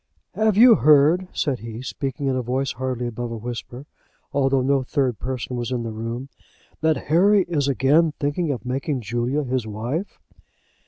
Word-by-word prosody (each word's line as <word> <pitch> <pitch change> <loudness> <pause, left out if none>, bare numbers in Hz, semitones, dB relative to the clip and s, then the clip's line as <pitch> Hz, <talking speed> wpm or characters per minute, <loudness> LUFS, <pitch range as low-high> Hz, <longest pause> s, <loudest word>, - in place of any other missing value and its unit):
"Have 220 -2 +1
you 240 +1 +9
heard," 155 +2 +4
said 135 -5 -1
he, 115 +1 -8
speaking 135 +1 -4
in 135 -1 +1
a 130 - 0
voice 130 +3 -1
hardly 130 -1 -3
above 120 0 -4
a 115 - -4
whisper, 120 +3 -7 0.5
although 135 -1 +2
no 135 +1 +2
third 130 -4 -1
person 130 -1 -4
was 120 0 -3
in 120 -2 -1
the 115 - -4
room, 115 +4 -5 0.5
"that 160 -1 +2 0.2
Harry 195 +3 +5
is 150 -6 -1
again 145 +4 +3
thinking 145 +4 -1
of 125 -6 -3
making 135 +1 -2
Julia 120 +6 -1
his 125 -3 -2
wife?" 120 - -4
130 Hz, 170 wpm, -23 LUFS, 120-150 Hz, 0.5 s, you